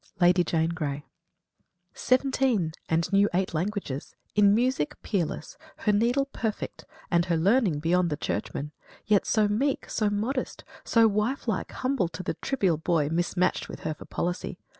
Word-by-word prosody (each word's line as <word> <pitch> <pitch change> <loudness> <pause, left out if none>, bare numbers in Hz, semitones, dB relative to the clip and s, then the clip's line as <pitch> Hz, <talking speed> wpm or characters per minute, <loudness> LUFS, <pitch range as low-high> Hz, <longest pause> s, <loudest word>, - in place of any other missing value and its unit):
VII - - -30
LADY 180 0 +5
JANE 165 -1 +1
GREY 150 -4 -3 0.9
"Seventeen 255 - +1 0.2
and 165 +4 0
knew 200 +1 +5
eight 185 -1 0
languages 170 -5 -3 0.2
in 205 -1 +5
music 245 - 0
Peerless 170 -5 -2 0.2
her 210 - +1
needle 240 +6 +2
perfect, 220 -2 -4 0.3
and 170 0 +3
her 170 -2 +1
learning 195 - +3
Beyond 170 +3 +2
the 150 - -2
Churchmen; 150 -1 -3 0.3
yet 210 -3 +3
so 215 -2 +3
meek, 260 +7 0
so 215 -2 +1
modest, 225 +6 -2 0.2
So 230 -1 +4
wife 215 +6 -1
like 215 -5 -1
humble 255 -8 0
to 170 +2 -7
the - - -1
trivial 195 - 0
boy 160 -2 +1
Mismatched 175 +2 0
with - - -8
her 155 - -2
for - - -12
policy! 175 +1 -3
190 Hz, 160 wpm, -27 LUFS, 165-225 Hz, 0.9 s, LADY